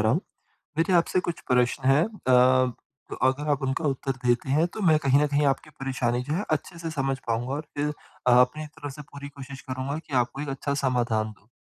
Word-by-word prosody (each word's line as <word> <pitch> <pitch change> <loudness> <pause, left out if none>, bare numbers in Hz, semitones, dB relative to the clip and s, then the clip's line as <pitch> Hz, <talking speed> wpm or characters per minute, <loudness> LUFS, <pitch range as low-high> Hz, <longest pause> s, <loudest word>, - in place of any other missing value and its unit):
रहा 110 +2 +3
हूँ। 165 - +2 0.6
मेरे 170 +3 +2
आपसे 175 +1 +3
कुछ 175 -2 -3
प्रश्न 125 +1 +2
हैं। 145 +4 +5
अ, 130 - +3 0.6
अगर 145 +3 -1
आप 140 - 0
उनका 135 +4 -1
उत्तर 135 -1 0
देते 120 +2 +2
हैं 155 +5 +3
तो 220 - -5
मैं 160 -4 +5
कहीं 140 -1 +4
न - - +4
कहीं 145 0 +2
आपकी 140 +3 0
परेशानी 125 -2 0
जो 145 - -3
है 185 +6 0
अच्छे 160 +3 -2
से 165 - -4
समझ 135 -2 -1
पाऊँगा 120 +3 -1
और 150 - -2 0.2
फिर 150 +1 0 0.4
अपनी 125 +5 +4
तरफ 145 -1 -8
से 150 - -9
पूरी 140 0 -8
कोशिश 140 -1 -10
करूँगा 130 +3 -4
कि 155 -3 -10
आपको 125 +3 -5
एक 150 - -4
अच्छा 140 +1 -2
समाधान 120 -4 +1
दूँ। 100 0 -21
135 Hz, 210 wpm, -26 LUFS, 125-150 Hz, 0.6 s, हैं